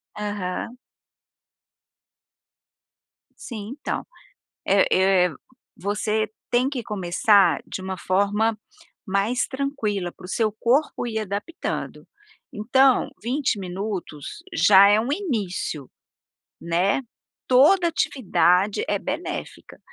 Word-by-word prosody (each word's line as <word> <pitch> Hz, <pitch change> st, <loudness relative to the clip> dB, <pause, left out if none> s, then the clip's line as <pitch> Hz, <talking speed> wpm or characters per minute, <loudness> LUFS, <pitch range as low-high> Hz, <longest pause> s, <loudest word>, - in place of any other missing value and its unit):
Aham. 205 Hz, +2 st, -4 dB, 2.6 s
Sim, 220 Hz, -1 st, -7 dB
então. -, -, -3 dB, 0.6 s
É 195 Hz, 0 st, +4 dB, 0.4 s
é -, -, 0 dB, 0.5 s
você 210 Hz, +3 st, -1 dB, 0.2 s
tem 250 Hz, +2 st, +2 dB
que 260 Hz, -4 st, -4 dB
começar 200 Hz, -1 st, +3 dB
de -, -, -6 dB
uma 190 Hz, 0 st, -5 dB
forma 205 Hz, +6 st, +1 dB, 0.5 s
mais 200 Hz, +6 st, 0 dB
tranquila, 250 Hz, -10 st, -2 dB
para -, -, -14 dB
o -, -, -9 dB
seu 215 Hz, +3 st, 0 dB
corpo 250 Hz, +1 st, +1 dB
ir 220 Hz, -2 st, -2 dB
adaptando. 210 Hz, -, -5 dB, 0.5 s
Então, 255 Hz, +5 st, +3 dB
20 250 Hz, -1 st, -1 dB
minutos 190 Hz, -, -6 dB
já 200 Hz, -1 st, +7 dB
é 205 Hz, +1 st, +5 dB
um 235 Hz, +5 st, -2 dB
início, 210 Hz, -, -3 dB, 0.7 s
né, 175 Hz, +8 st, +1 dB, 0.5 s
toda 305 Hz, +8 st, +5 dB
atividade 200 Hz, -, +1 dB
é 205 Hz, -, 0 dB
benéfica, 300 Hz, -, -6 dB
210 Hz, 95 wpm, -23 LUFS, 195-250 Hz, 2.6 s, já